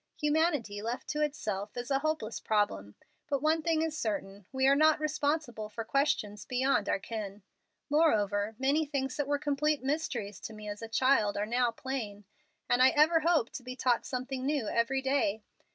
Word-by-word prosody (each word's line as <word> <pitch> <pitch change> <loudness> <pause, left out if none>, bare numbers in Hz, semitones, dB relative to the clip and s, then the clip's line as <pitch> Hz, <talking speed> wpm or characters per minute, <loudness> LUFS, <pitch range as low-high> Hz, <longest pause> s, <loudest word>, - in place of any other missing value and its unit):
Humanity, 295 -9 +1
left 240 +4 -4
to 300 - -1
itself, 215 -8 -2
is 245 +2 -4
a 270 - +3
hopeless 310 -7 -2
problem. 105 - -1 0.3
But 280 -1 -1
one 315 +1 +3
thing 320 0 +1
is 320 -1 -2
certain: 200 -6 -4
we 265 0 +1
are 275 +1 +6
not 310 +1 +4
responsible 290 -7 -1
for 225 +2 -5
questions 220 -5 0
beyond 255 -4 +1
our - - +2
ken. 205 -1 -6 0.4
Moreover, 215 -9 +2
many 275 +5 +2
things 275 -3 -2
that 290 -2 -1
were 290 0 +1
complete 295 0 0
mysteries 265 -8 -2
to 220 - -7
me 215 0 -9
as 205 +1 -6
a 225 - -5
child 225 -3 +2
are 205 - 0
now 240 +2 +1
plain, 230 -4 -5 0.4
and 245 - +3
I 260 - +8
ever 315 +4 +4
hope 320 -7 +2
to - - -6
be 255 +1 -7
taught 245 -1 +1
something 255 0 -4
new 275 -5 0
every 255 +5 0
day. 245 -6 +1
260 Hz, 185 wpm, -30 LUFS, 215-295 Hz, 0.4 s, I